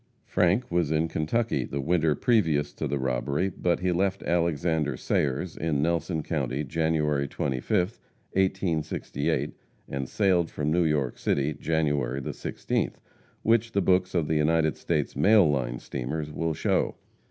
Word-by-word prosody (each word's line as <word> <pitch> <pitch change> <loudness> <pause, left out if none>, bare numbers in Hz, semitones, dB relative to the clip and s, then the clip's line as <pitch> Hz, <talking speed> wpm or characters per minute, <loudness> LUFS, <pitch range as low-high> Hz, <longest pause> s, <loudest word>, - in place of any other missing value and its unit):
Frank 95 +7 +1
was 85 -3 +1
in 80 +1 +2
Kentucky 90 +9 0
the 70 - -4
winter 80 +1 +2
previous 80 -11 +2
to - - -3
the 70 - -1
robbery, 65 +7 -1
but 90 0 0
he 90 0 +1
left 95 +2 0
Alexander 80 -4 0
Sayer's, 70 +7 -1
in 75 -3 0
Nelson 85 -1 0
county, 70 +1 -2
January 75 -1 0
25th, 70 - -1 0.3
1868, 95 -5 -1 0.3
and 70 -1 -4
sailed 90 -5 +2
from 75 0 -2
New 85 +1 +3
York 70 -5 0
City, 70 +2 0
January 75 -4 0
the 65 - -4
16th, - - -2 0.5
which 115 +1 +2
the 100 - +2
books 90 0 +2
of 80 -4 +1
the - - 0
United 80 0 +2
States - - -1
mail 100 +6 +5
line 65 -5 0
of - - -10
steamers 75 +4 -4
will 80 +1 -2
show. - - 0
80 Hz, 150 wpm, -27 LUFS, 70-90 Hz, 0.5 s, mail